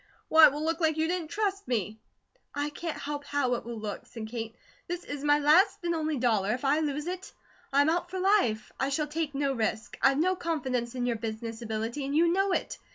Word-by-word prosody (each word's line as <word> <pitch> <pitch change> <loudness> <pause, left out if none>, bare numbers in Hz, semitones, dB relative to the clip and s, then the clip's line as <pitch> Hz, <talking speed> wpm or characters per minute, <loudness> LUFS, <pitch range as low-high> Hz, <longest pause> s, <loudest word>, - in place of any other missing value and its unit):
Why, 320 0 +9
it - - +1
will 295 +2 -4
look 330 +1 0
like 320 -2 +2
you 315 0 +1
didn't 350 -2 -2
TRUST 400 +2 -2
me!" 220 -3 -2 0.6
"I 290 +1 -1
can't 330 +1 -5
help 290 0 -4
how 285 -3 0
it 240 - -2
will 235 -1 -5
look," 210 -2 -6
said 220 -2 -7
Kate. 225 -1 -5 0.3
"This 350 0 -4
is 290 -1 -6
my 290 0 +5
last 310 +8 +5
and 340 0 0
only 310 -2 -1
dollar; 220 -4 +2
if 255 - -6
I 285 +3 +3
lose 300 -1 -2
it, 365 +1 -5 0.4
I 280 +1 +5
am 290 - +3
out 350 +1 -1
for 375 - -5
life; 365 - +2
I 265 - +1
shall 300 +2 0
take 300 -1 -3
no 275 -1 +1
risk. 220 -1 -2
I've 270 0 +4
no 365 +5 +2
confidence 260 -8 -2
in 245 -1 -1
your 240 -2 0
business 225 +1 -5
ability, 225 +4 -3
and 280 +2 -2
you 335 +2 +4
know 390 +1 +2
it. - - -2
290 Hz, 230 wpm, -29 LUFS, 240-330 Hz, 0.6 s, Why